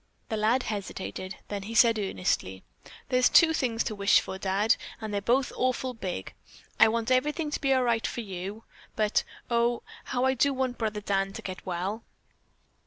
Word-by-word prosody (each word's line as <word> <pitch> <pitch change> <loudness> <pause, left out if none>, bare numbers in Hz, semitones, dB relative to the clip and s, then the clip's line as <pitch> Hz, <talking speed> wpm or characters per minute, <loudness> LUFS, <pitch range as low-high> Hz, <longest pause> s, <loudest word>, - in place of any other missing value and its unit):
The 220 - -1
lad 225 +5 +2
hesitated, 195 -2 -5
then 205 -1 -3
he 220 +4 -7
said 230 -1 +5
earnestly: 180 - -1 0.5
"There's 250 0 +4
two 325 -2 +6
things 240 -6 0
to 220 - -3
wish 200 0 +4
for, 190 - -6
Dad, 195 +3 +2 0.2
and 215 -2 -5
they're 200 - 0
both 245 +5 +1
awful 255 0 0
big. 185 - -5 0.5
I 225 - +9
want 230 +2 -1
everything 295 +4 +1
to - - -3
be 275 - +1
all 260 -1 +4
right 235 -2 +1
for 240 - -4
you, 195 +1 -6 0.3
but, 215 -1 +2 0.3
oh, 235 0 +2 0.2
how 250 0 0
I 265 - +3
do 275 +2 +2
want 255 -1 -2
brother 215 -2 -2
Dan 195 -1 0
to - - -8
get 185 -1 -6
well." 190 +5 -3
225 Hz, 180 wpm, -28 LUFS, 200-250 Hz, 0.5 s, I